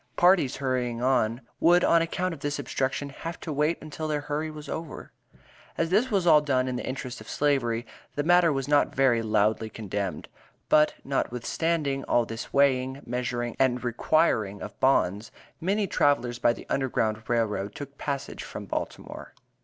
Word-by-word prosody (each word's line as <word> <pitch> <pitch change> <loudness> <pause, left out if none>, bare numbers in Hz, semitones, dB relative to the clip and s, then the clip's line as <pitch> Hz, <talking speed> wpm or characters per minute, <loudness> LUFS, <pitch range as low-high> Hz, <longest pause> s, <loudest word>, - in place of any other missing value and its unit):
Parties 175 -7 +4
hurrying 125 -3 -1
on 125 -2 +2 0.2
would 175 +1 +5
on 170 - +5
account 180 +2 -1
of 160 - -9
this 145 +1 -2
obstruction 140 0 -2
"have 165 +4 -7
to 160 - -4
wait 150 +4 +1
until 155 0 -5
their 150 -1 -1
hurry 150 +2 -3
was 155 -1 -9
over." 160 -2 -6 0.7
As 165 +1 0
this 220 +7 +3
was 195 -6 +1
all 155 -3 +7
done 130 -3 +1
in 130 - -2
the - - -4
interest 130 -1 -5
of - - -11
Slavery, 125 -5 0 0.3
the 145 - 0
matter 175 0 +5
was 135 -2 -2
not 145 0 +2
very 130 -4 +3
loudly 110 0 +1
condemned. 100 -6 -4 0.4
But, 150 0 +4
notwithstanding 140 +3 -1
all 120 - +2
this 115 0 -7
weighing, 135 -1 +2
measuring 120 -1 -3
and 125 -2 +2
requiring 120 -5 +1
of 105 - -9
bonds, 110 -6 +2 0.3
many 200 +4 0
travelers 125 -8 +1
by 120 - +3
the - - -11
Underground 110 -5 0
Rail 115 -1 +3
Road 105 -1 -4
took 140 0 -9
passage 140 -1 -4
from - - -7
Baltimore. - - -6
135 Hz, 170 wpm, -27 LUFS, 120-155 Hz, 0.7 s, all